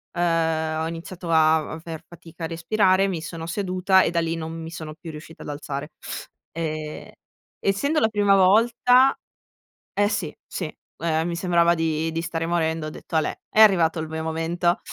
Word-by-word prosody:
uhm, 160 -2 +1
ho - - -1
iniziato 170 +1 -6
a 160 -1 +4
aver 160 0 -7
fatica 170 -1 -12
a - - 0
respirare, 185 +3 +2
mi 175 -4 -3
sono 165 +1 -6
seduta 190 +1 +2
e - - 0
da 170 - +1
lì 165 0 -1
non 160 0 -5
mi 160 - -6
sono 155 -2 -7
più 165 +1 -10
riuscita 155 +1 -11
ad - - -8
alzare. 145 0 -5 0.6
Ehm, 155 -2 -5 0.5
essendo 280 +11 +1
la 220 - +4
prima 205 -2 +3
volta 240 +7 +5 0.8
eh, 205 0 +2
sì, 180 -7 -3
sì. 160 -5 -5 0.3
Ehm, 160 0 +1
mi 170 - -2
sembrava 170 -1 +3
di 160 0 0
di 165 +1 -2
stare 165 -1 -3
morendo, 160 -2 0
ho - - -4
detto: 160 - -8
"Alè, 155 - 0 0.2
è 220 - +4
arrivato 175 -6 +5
il 160 - -3
mio 160 0 -4
momento." 170 +2 0
165 Hz, 175 wpm, -24 LUFS, 160-185 Hz, 0.8 s, volta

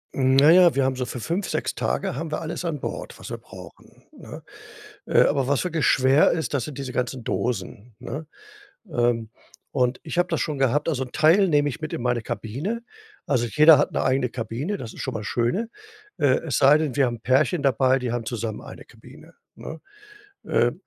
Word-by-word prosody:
Hm, 130 0 +2
na 145 +3 +7
ja, 175 -2 +6
wir 135 - +2
haben 130 - 0
so 125 -1 -3
für 125 - -6
5, 170 - -3
6 - - -2
Tage 195 -1 -2
haben 160 -1 -5
wir - - -2
alles 165 +2 -5
an 155 -4 -2
Bord, - - -6
was - - -9
wir - - -4
brauchen, - - -15
ne? - - -11 0.6
Äh, - - +4
aber 135 -2 +1
was 140 +3 +1
wirklich 165 -5 0
schwer 135 +3 +4
ist, 160 -1 -2
das 135 -5 -1
sind 145 0 -8
diese 135 -2 -5
ganzen 125 -1 -3
Dosen, 115 0 -3
ne? 140 +5 -7 0.7
Ähm, 120 -3 0 0.4
und 125 -1 0
ich 170 +2 -3
habe 175 - +2
das 165 - -1
schon 150 -4 -2
gehabt. 135 +4 +1
Also, 135 -5 0
'n 125 - -15
Teil 170 +6 +4
nehme 145 -2 +2
ich 160 +4 -8
mit 155 - -5
in - - -3
meine 120 -1 0
Kabine. 150 - -4 0.4
Also, 120 -4 0
jeder 150 +4 +6
hat - - +1
'ne - - 0
eigene 130 -2 +1
Kabine, 125 - -4
das 115 -9 -8
ist - - -8
schon - - -4
mal 110 - -3
das 105 - -6
Schöne. 125 - -1 0.5
Äh, 130 -3 +3
es 140 -7 -1
sei 140 +2 +6
denn, 155 -5 -2
wir 140 -2 +3
haben 120 -1 -4
Pärchen 135 +6 +2
dabei, 130 0 +3
die 125 -2 -3
haben 120 -1 -3
zusammen 115 -2 -4
eine - - -11
Kabine, - - -16 0.2
ne? 160 0 -9 0.6
Äh, - - +2
135 Hz, 215 wpm, -24 LUFS, 125-155 Hz, 0.7 s, na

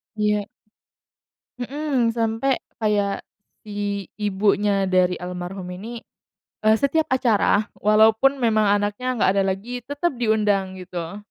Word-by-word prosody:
Iya. 210 -1 +1 1.1
Mhm, 265 -1 0
sampai 230 +4 +1 0.2
kayak, 205 -2 +1 0.4
si 205 -2 -4
ibunya 200 -1 +1
dari 185 -1 +3
almarhum 180 +1 -6
ini, 230 +4 -7 0.6
eee, 215 0 +5
setiap 295 +5 +1
acara 225 -5 +2
walaupun 220 +6 +4
memang 220 -4 +2
anaknya 210 +5 -2
nggak 210 - +3
ada 195 -1 +2
lagi, 240 +6 -7
tetep 285 +6 -2
diundang 210 -4 +1
gitu. 180 0 -6
210 Hz, 110 wpm, -23 LUFS, 195-240 Hz, 1.1 s, eee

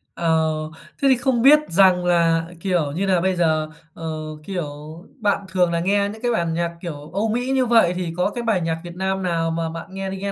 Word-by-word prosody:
Ờ, 160 -1 +2 0.6
thế 275 - +3
thì 260 - +5
không 245 -1 +1
biết 290 +4 +7
rằng 180 0 +4
là, 165 -2 +2
kiểu 175 -5 0
như 180 +7 -2
là, 185 -3 +2
bây 190 +1 +1
giờ, 155 -3 +1 0.2
ờ, 160 -1 -5 0.2
kiểu, 180 -2 -3 0.5
bạn 205 -2 0
thường 180 -1 +2
là 170 - 0
nghe 200 +3 +1
những 220 +2 -9
cái 245 -1 0
bản 170 -7 0
nhạc 170 +1 -1
kiểu 150 -3 -7
Âu 210 +4 0
Mỹ 245 +4 -1
như 260 -1 +2
vậy, 230 -7 +4
thì 175 -2 -3
có 180 - +1
cái 240 +3 -5
bài 220 -6 +1
nhạc 165 0 -2
Việt 175 -1 -9
Nam 190 +1 -2
nào 165 -2 0
mà 165 0 -2
bạn 165 +1 -7
nghe 195 0 -4
đi 190 - -5
nghe 200 +1 -3
180 Hz, 235 wpm, -22 LUFS, 165-200 Hz, 0.6 s, biết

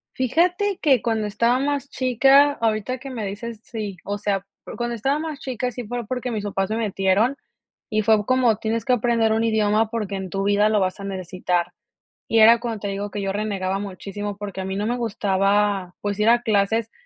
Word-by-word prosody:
Fíjate 355 - +1
que 270 -7 +4
cuando 220 -2 0
estaba 235 +5 +2
más 285 0 -1
chica, 270 +3 +4
ahorita 225 +1 -1
que 270 +2 -9
me 230 -4 -4
dices, 215 +3 -6
sí, 210 -5 -6
o 205 0 -3
sea, 200 -1 -1 0.2
o, - - -8
cuando 240 0 -2
estaba 275 +7 0
más 310 -3 -5
chica, 250 -1 -3
sí 245 +1 -6
pero 240 +1 -4
porque 250 -1 -3
mis 210 -2 -3
papás 195 -1 -2
se 220 - -1
metieron 210 +4 +1 0.5
y 215 -1 +1
fue 215 -1 +3
como: 250 -3 +3
"Tienes 225 0 -2
que 255 - +3
aprender 230 -1 +2
un 225 +1 +1
idioma 220 0 +2
porque 210 -4 -3
en 190 -1 -5
tu 195 0 -1
vida 205 +1 +3
lo 215 -1 +2
vas 185 +1 -1
a - - -7
necesitar", 185 -2 -2 0.5
y 225 - +3
era 230 +1 +8
cuando 230 -3 -4
te 200 - -3
digo 200 +1 -3
que 205 - -4
yo 195 0 -1
renegaba 195 -2 -2
muchísimo 200 +1 -6
porque 200 -2 -6
a - - -4
mí 190 - -3
no 205 +2 -2
me 245 +1 -1
gustaba, 200 -3 0
pues 205 0 -3
ir 215 +2 +4
a 240 0 +5
clases, 220 +1 +1
215 Hz, 210 wpm, -23 LUFS, 200-240 Hz, 0.5 s, era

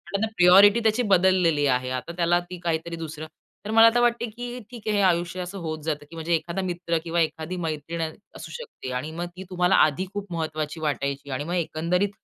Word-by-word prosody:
Priority 200 0 +6 0.2
ती - - +2
बदललेली 185 -6 +3
आहे. 125 -1 +1
आता 130 +6 -4
त्याला 175 0 +3
ती 180 -1 -7
काहीतरी 170 0 -2
दुसरं 160 -1 -7 0.4
तर 215 - -3
मला 225 +1 +8
आता 230 +1 +3
वाटतं 240 -1 +1
की 245 +1 -6
ठीक 230 -3 -10
आहे, 215 - +1
हे - - +3
आयुष्य 175 0 +1
असं 180 +2 -6
होत 160 -2 -4
जातं 150 -2 -3
की 165 - -12
म्हणजे 165 +1 -2
एखादा 170 +3 -3
मित्र 175 -2 -1
किंवा 170 0 -1
एखादी 160 +2 -2
मैत्रीण 160 +2 -4 0.3
असू - - -9
शकते. 475 - -8
आणि 130 +5 -3
मग 170 +2 -4
ती 185 - -7
तुम्हाला 180 0 +2
आधी 155 +5 +3
खूप 205 -2 -6
महत्त्वाची 155 -1 -3
वाटायची 140 -2 -2
आणि 130 +2 -2
मग 170 +4 -4
एकंदरीत 175 +3 0
170 Hz, 200 wpm, -25 LUFS, 155-190 Hz, 0.4 s, मला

